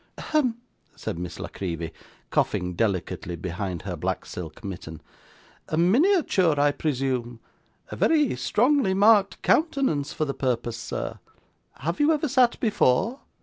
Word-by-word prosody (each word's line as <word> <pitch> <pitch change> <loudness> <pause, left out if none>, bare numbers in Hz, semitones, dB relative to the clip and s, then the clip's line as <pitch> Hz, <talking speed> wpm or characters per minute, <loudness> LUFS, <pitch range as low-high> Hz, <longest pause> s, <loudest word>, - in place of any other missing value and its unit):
'Hem!' 255 -7 0 0.4
said 85 - -5
Miss 90 -1 -6
La - - -4
Creevy, 85 -3 -5 0.4
coughing 90 0 0
delicately 90 -3 -2
behind 90 +1 -4
her - - -4
black - - -3
silk 80 0 -8
mitten. 85 -5 -7 0.7
'A 155 - -2
miniature, 190 - +3
I 145 0 +4
presume. 130 -5 -2 0.5
A - - -4
very 300 -6 +3
strongly 245 -4 +2
marked 205 0 +4
countenance 270 - +2
for 155 - -1
the 140 - -2
purpose, 120 -3 -2
sir. 120 - -5 0.6
Have 170 +5 -2
you 295 +2 +4
ever 305 0 +1
sat 255 -3 +3
before? 215 - +2
150 Hz, 135 wpm, -25 LUFS, -, 0.7 s, I